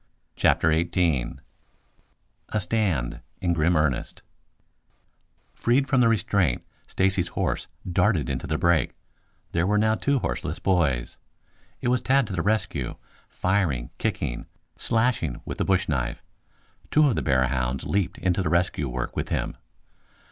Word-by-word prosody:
CHAPTER 80 - +3
XVIII 80 -6 +1 1.1
A 105 - 0
STAND 90 - -1 0.2
IN 85 -1 +1
GRIM 85 +2 +2
EARNEST 75 -4 -1 1.3
Freed 130 +4 +2
from 130 -3 +3
restraint 100 - +2 0.2
Stacy's 95 -2 +1
horse - - -2 0.2
darted 90 - +2
into - - -3
the 80 - 0
brake. 85 -2 +2 0.6
There 85 +1 +1
were 105 +1 +2
now 110 +1 +3
two 140 +5 +1
horseless - - -3
boys. 80 -11 0 0.6
It - - 0
was 125 -1 +2
Tad 135 +1 +3
to 100 - -6
the 90 - 0
rescue, 95 - -1 0.3
firing, 90 -11 0
kicking, - - -2 0.3
slashing 110 - 0
with - - -6
the - - +1
bush 95 -1 +2
knife. 60 -5 -2 0.7
Two 155 0 +5
of 130 - +2
the - - -1
bear 65 -1 +3
hounds 65 -1 -1
leaped 100 -3 -1
into 90 +1 +1
the 90 - -1
rescue 85 -4 +1
work - - -4
with - - -2
him. - - -2
90 Hz, 140 wpm, -25 LUFS, 75-105 Hz, 1.3 s, Two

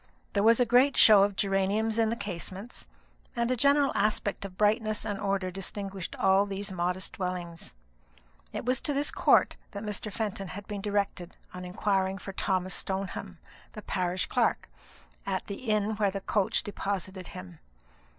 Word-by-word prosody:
There 200 - +2
was 230 +3 +5
a 245 - +5
great 255 +4 +4
show 210 -3 +8
of 200 0 +2
geraniums 200 +3 +1
in 225 -1 +3
the 230 - 0
casements, 200 +2 -5 0.5
and 235 +1 +1
a - - +3
general 280 +3 +4
aspect 205 -1 0
of 185 -1 -9
brightness 215 0 +2
and 205 -2 -3
order 195 -2 -1
distinguished 195 0 -4
all 195 +1 +3
these 200 0 -4
modest 180 0 -2
dwellings. 175 - -5 0.8
It - - -5
was 255 0 +1
to 295 - 0
this 285 +1 0
court - - +4 0.2
that 200 +1 -5
Mr. 210 0 -3
Fenton 200 -2 -3
had 195 +4 -7
been 205 -2 -4
directed 200 -4 -2 0.2
on 180 0 -7
inquiring 190 +1 0
for 195 0 -8
Thomas 185 -1 0
Stoneham, 190 0 -3 0.4
the 215 - -8
parish 180 -2 -1
clerk, 240 +6 0 0.6
at 190 -1 -1
the 210 +4 -6
inn 215 0 +2
where 205 -2 +2
the 195 0 -4
coach 200 0 +1
deposited 190 -2 -4
him. 90 -3 -10
200 Hz, 165 wpm, -29 LUFS, 190-215 Hz, 0.8 s, show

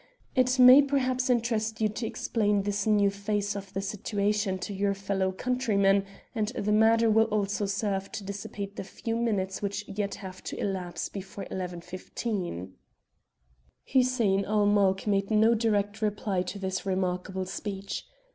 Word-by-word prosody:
It 255 0 +3
may 255 +2 +10
perhaps 260 -2 0
interest 225 -2 0
you 220 - +3
to 225 +2 -4
explain 205 -4 0
this 205 +1 -1
new 205 -2 +4
phase 205 0 -2
of 195 -1 -7
the 195 - -2
situation 205 0 -1
to 200 - -5
your 200 0 0
fellow 195 -1 -1
countrymen, 200 -3 +2 0.3
and 220 -3 0
the 205 +1 -1
matter 225 +2 +5
will 220 0 +5
also 205 -2 -1
serve 195 -1 -2
to 210 - -5
dissipate 200 0 -6
the - - -3
few 225 +3 -4
minutes 205 -5 -1
which 205 +1 -3
yet 200 0 -3
have 190 -2 -9
to - - -5
elapse 180 -3 -3
before 195 0 -7
11.15." 180 - -4 1.2
Hussein 245 -7 +3
ul 210 0 +2
Mulk 200 -2 +3
made 200 -1 +1
no 220 +1 +5
direct 215 -2 0
reply 205 -3 0
to 180 +2 -5
this 190 -1 -3
remarkable 185 0 -2
speech. 195 +1 -5
205 Hz, 150 wpm, -28 LUFS, 195-220 Hz, 1.2 s, may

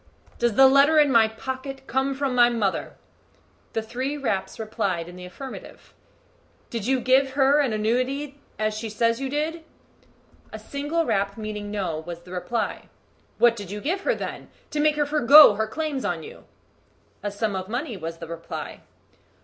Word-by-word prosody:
"Does 240 -3 +1
the 270 - +8
letter 275 +4 +6
in 295 -2 +5
my 230 -3 +6
pocket 260 +4 -6
come 270 +2 0
from 275 -1 -1
my 240 -1 +6
mother?" 215 -5 -2 0.8
The 225 - -1
three 260 +6 -3
raps 195 -9 -2
replied 200 -6 -2
in 175 - -11
the 180 0 -9
affirmative. 265 +9 -10 0.8
"Did 230 -2 -3
you 265 0 +2
give 265 +2 +3
her 275 +1 +4
an 275 -5 +2
annuity, 255 +6 -1 0.2
as 215 0 0
she 220 +1 -5
says 230 +3 0
you 270 - -2
did?" 310 +4 -2 0.9
A - - -6
single 295 +4 -2
rap, 200 -3 0
meaning 210 -1 -5
"No," 190 -6 -2
was 170 +1 -8
the 180 - -15
reply. 220 +6 -3 0.5
"What 240 -1 +5
did 205 -5 -8
you 205 +2 -5
give 350 - -2
her, - - +1
then, - - -6 0.2
to 300 - -2
make 305 0 +3
her 295 -1 +1
forego 290 -2 +8
her 220 +1 -1
claims 300 +1 -3
on - - -2
you?" 460 +3 -12 0.8
"A 205 - -2
sum 205 0 -2
of 190 +1 -5
money," 245 +1 -3
was 165 -2 -6
the 165 - -8
reply. 165 0 -7
240 Hz, 175 wpm, -24 LUFS, 210-280 Hz, 0.9 s, the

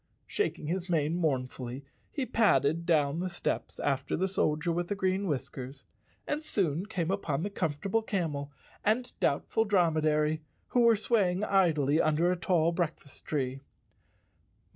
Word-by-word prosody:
Shaking 420 - -2
his 180 +3 -2
mane 165 0 +1
mourn¬ 135 -6 +1
fully, 130 +2 -7 0.2
he 275 -4 -2
padded 170 - +2
down 150 -2 +2
the 185 +1 -2
steps 175 - -3
after 140 -2 0
the 190 - +1
Soldier 165 -3 0
with 175 +1 -1
the 205 - -2
Green 190 0 0
Whiskers, 135 -2 -5 0.4
and 295 +1 -2
soon 190 - 0
came 180 -5 -1
upon 165 -7 -1
the 200 - -3
Com 180 -4 0
[i!i] - - -4
Chapter 160 +7 -6
Eight - - -7
fortable 225 +1 +1
Camel 150 -7 -2 0.3
and 235 +4 +1
Doubtful 225 0 +1
Dromedary, 155 -5 +2 0.3
who 245 - +2
were 235 -1 +6
swaying 200 -3 +1
idly 160 -7 +3
under 155 +3 +2
a - - +1
tall 170 -2 +2
breakfast 165 -4 -4
tree. 135 -3 -2
170 Hz, 165 wpm, -30 LUFS, 150-195 Hz, 0.4 s, were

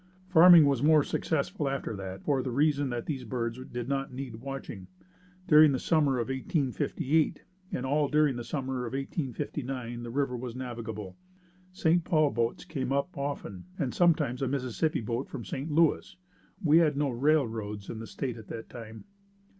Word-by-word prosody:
Farming 175 -2 +9
was 140 -4 +2
more 150 0 +5
successful 155 +1 -1
after 135 -5 -3
that, 95 -1 -7
for 140 -3 +1
the 130 - -3
reason 145 +2 +2
that 120 -1 -3
these 135 -5 -3
birds 115 0 -3
did 120 0 -4
not 135 -1 -2
need 125 -3 -6
watching. 125 -7 -7 0.6
During 155 -3 +7
the - - +1
summer 150 -3 +2
of 125 0 -1
1858 140 +1 0 0.3
and 130 - -3
all 145 +2 +2
during 150 -2 +3
the 120 - -5
summer 130 -1 -3
of 115 - -7
1859 135 -3 -4
the 120 - -6
river 135 0 -1
was 120 -1 -6
navigable. 115 -6 -6 0.5
St. 175 -2 +2
Paul 155 -4 +2
boats 115 +7 -1
came 135 -7 -3
up 140 +7 -1
often 140 - -5
and 130 -4 -2
sometimes 150 -7 +2
a 135 - +1
Mississippi 135 +3 -1
boat 115 +4 -3
from 120 - -7
St. 140 +4 -4
Louis. 165 +4 +2 0.5
We 160 0 +6
had 155 -4 +2
no 145 -2 +1
railroads 115 -7 0
in 110 - -6
the 115 - -7
state 125 -4 -4
at 110 - -11
that 115 -1 -7
time. 115 -2 -10
135 Hz, 170 wpm, -29 LUFS, 120-150 Hz, 0.6 s, Farming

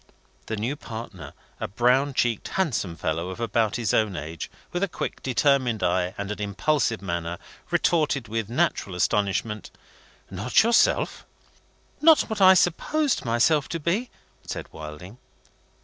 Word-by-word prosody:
The 110 - -2
new 115 +7 -2
partner, 110 - -8 0.3
a - - -3
brown 125 +6 +2
cheeked 120 -4 0
handsome 125 - -1
fellow, 80 +2 -2
of 95 - -7
about 115 -1 0
his 115 -4 -1
own 105 -3 +2
age, 80 +1 -6 0.2
with 175 - -2
a 200 - +2
quick 170 - -5
determined 125 -3 +1
eye 90 +1 0
and 100 0 -4
an 105 - -5
impulsive 115 +2 0
manner, 85 -2 -3 0.3
retorted 150 -7 +1
with 110 -1 -3
natural 125 - 0
astonishment: 105 +3 0 0.6
"Not 100 - +3
yourself?" 230 0 +2 0.8
"Not 320 0 +7
what 215 -2 -2
I 190 0 +8
supposed 265 - +1
myself 120 +6 +2
to 165 - -3
be," 190 +11 -1 0.3
said - - -6
Wilding. 80 +8 -9
115 Hz, 140 wpm, -25 LUFS, 95-150 Hz, 0.8 s, I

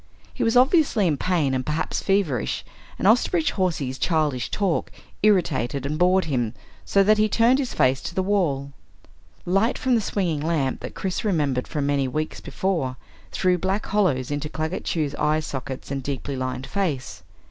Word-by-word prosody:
He - - -2
was 225 +2 +3
obviously 260 - +4
in 160 -4 +2
pain 155 -4 0
and 130 0 0
perhaps 155 +4 -2
feverish, 190 - 0 0.3
and - - +1
Osterbridge 305 - +3
Hawsey's 155 -9 -1
childish 150 -7 0
talk 195 -5 -1 0.3
irritated 140 - +2
and 150 +2 -2
bored 185 +1 +4
him 125 -6 -1 0.3
so 200 - +3
that 215 +2 +4
he 215 0 +3
turned 235 +5 +4
his 265 -3 -3
face 130 +1 +3
to - - -6
the 190 - +1
wall. 150 -9 0 0.7
Light 195 +7 +2
from 260 - 0
the 230 - +3
swinging 175 -7 -1
lamp 150 -5 0
that - - -8
Chris 190 -2 -3
remembered 145 - 0
from 145 -3 -2
many 140 -1 +1
weeks 155 +4 -3
before 160 -10 -2 0.3
threw 180 -1 +1
black 190 +4 -1
hollows 155 -11 +1
into 145 +1 -2
Claggett 160 +3 -3
Chew's 150 -4 -1
eye 155 +1 +2
sockets 135 -3 -6
and 135 0 -2
deeply 140 +1 -4
lined 130 0 -3
face. 140 - -3
160 Hz, 170 wpm, -24 LUFS, 135-195 Hz, 0.7 s, obviously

